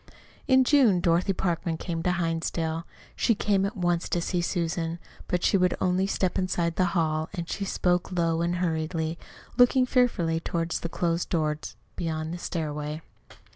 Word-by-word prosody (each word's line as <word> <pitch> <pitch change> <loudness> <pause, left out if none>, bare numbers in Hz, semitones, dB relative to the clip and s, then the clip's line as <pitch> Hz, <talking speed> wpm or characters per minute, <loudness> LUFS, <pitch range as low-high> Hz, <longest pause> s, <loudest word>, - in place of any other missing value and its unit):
In 260 -1 +6
June 250 -9 +4
Dorothy 175 +3 +2
Parkman 170 -2 -1
came 165 -1 -3
to 180 - +1
Hinsdale. 165 -1 -2 0.3
She 230 - +2
came 200 -1 +1
at 210 +2 -7
once 175 -1 0
to 175 - +1
see 175 +1 -1
Susan. 170 -1 -1 0.3
But 180 -1 -1
she - - +4
would 180 -1 +2
only 185 +1 +1
step 185 -2 0
inside 175 -3 0
the 185 - +3
hall, 155 -1 0
and 170 -2 -4
she 200 - -3
spoke 180 -1 0
low 165 -2 +1
and 170 +1 0
hurriedly, 160 -1 -1 0.4
looking 250 +1 +5
fearfully 235 -11 +2
toward 165 0 -2
the 170 - -2
closed 170 0 -1
doors 155 -3 -1 0.2
beyond 160 -1 -3
the 175 - -5
stairway. 150 -2 -4
170 Hz, 165 wpm, -27 LUFS, 165-185 Hz, 0.4 s, In